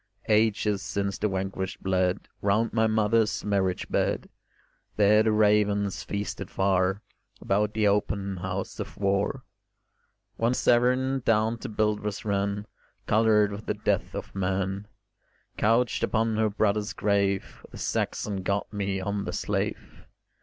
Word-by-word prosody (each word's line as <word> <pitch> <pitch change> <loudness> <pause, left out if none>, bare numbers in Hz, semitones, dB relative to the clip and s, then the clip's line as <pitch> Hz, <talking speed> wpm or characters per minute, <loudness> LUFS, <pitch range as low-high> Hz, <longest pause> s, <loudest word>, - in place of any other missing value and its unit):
Ages 105 -2 +2
since 100 -1 -2
the 105 - +1
vanquished 95 0 -4
bled 95 0 0
Round 105 +3 +1
my 110 0 +3
mother's 110 0 +1
marriage 95 -3 0
bed; - - -1 0.7
There 105 +1 +5
the 110 0 +2
ravens 105 -2 +2
feasted 100 -1 -4
far 95 +1 +1 0.4
About 105 +2 0
the 110 -1 +3
open 100 -1 0
house 90 +1 -4
of - - -6
war: 100 0 0 0.9
When 115 +2 +1
Severn 130 +3 +2
down 115 -1 +1
to - - -6
Buildwas 105 -1 -1
ran 100 0 -1 0.4
Coloured 105 -1 +3
with 100 +2 -8
the - - 0
death - - -1
of - - -6
man, 95 +1 -2 0.7
Couched 115 +3 +2
upon 110 0 +1
her 110 0 +2
brother's 105 0 0
grave 100 -1 0
The - - -11
Saxon 100 -2 -2
got 100 +3 -2
me 100 -1 -1
on 100 +1 -2
the - - -4
slave. - - -3
105 Hz, 130 wpm, -27 LUFS, 100-110 Hz, 0.9 s, There